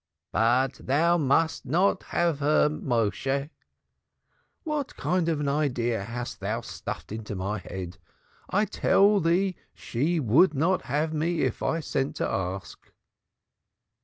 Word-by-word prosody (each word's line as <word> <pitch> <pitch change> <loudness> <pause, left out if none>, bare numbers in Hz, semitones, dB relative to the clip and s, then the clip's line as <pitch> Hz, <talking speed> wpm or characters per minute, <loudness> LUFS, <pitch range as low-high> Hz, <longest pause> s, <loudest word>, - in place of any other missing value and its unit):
But 125 +4 +2
thou 170 +6 +3
must 160 +3 +2
not 180 +7 +2
have 170 -4 0
her, 150 +1 +3
Méshe." 135 +1 -1 1.1
"What 300 -4 -3
kind 180 -2 0
of 150 -3 -1
idea 125 -5 0 0.4
thou - - -2
stuffest - - -7
into 110 -1 -5
my 100 +3 -2
head! 90 -2 -7 0.5
I 205 +3 +2
tell 205 0 +3
thee 180 +3 +1 0.2
she 155 +8 -1
would 150 - +4
not 170 +7 +2
have 150 +4 -1
me 160 +1 0
if - - -1
I 165 - 0
sent 135 -2 -2
to - - -1
ask." 95 0 -5
150 Hz, 125 wpm, -27 LUFS, 120-170 Hz, 1.1 s, would